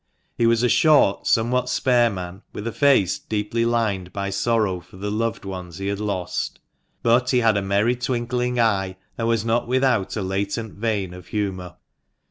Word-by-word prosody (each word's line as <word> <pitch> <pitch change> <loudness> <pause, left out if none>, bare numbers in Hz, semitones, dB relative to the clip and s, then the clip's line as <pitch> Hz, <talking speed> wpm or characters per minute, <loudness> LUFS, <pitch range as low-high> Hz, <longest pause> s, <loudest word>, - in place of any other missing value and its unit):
He 115 - +2
was 115 +1 +3
a - - +4
short, 145 -7 +4
somewhat 125 +2 +2
spare 125 -2 +3
man, 90 -1 -6
with 105 - -6
a 115 - -2
face 135 - +3
deeply 110 +2 -2
lined 105 -6 0
by 100 0 -3
sorrow 100 -2 +1
for 90 - -16
the 105 +2 -4
loved 110 -1 -2
ones 90 -3 -7
he 95 - -5
had 100 0 -2
lost. 100 -4 -3 0.4
But 120 +2 +3
he 125 -2 +3
had 115 -2 +3
a 100 - +1
merry 100 +5 +1
twinkling 125 0 -1
eye, 95 -5 +1 0.2
and 115 - -2
was 115 -2 +1
not 115 +1 +1
without 125 -5 +1
a 105 - -2
latent 100 +4 -3
vein 100 -4 -2
of 90 -1 -11
humour. 95 -4 -3
110 Hz, 180 wpm, -23 LUFS, 95-120 Hz, 0.4 s, a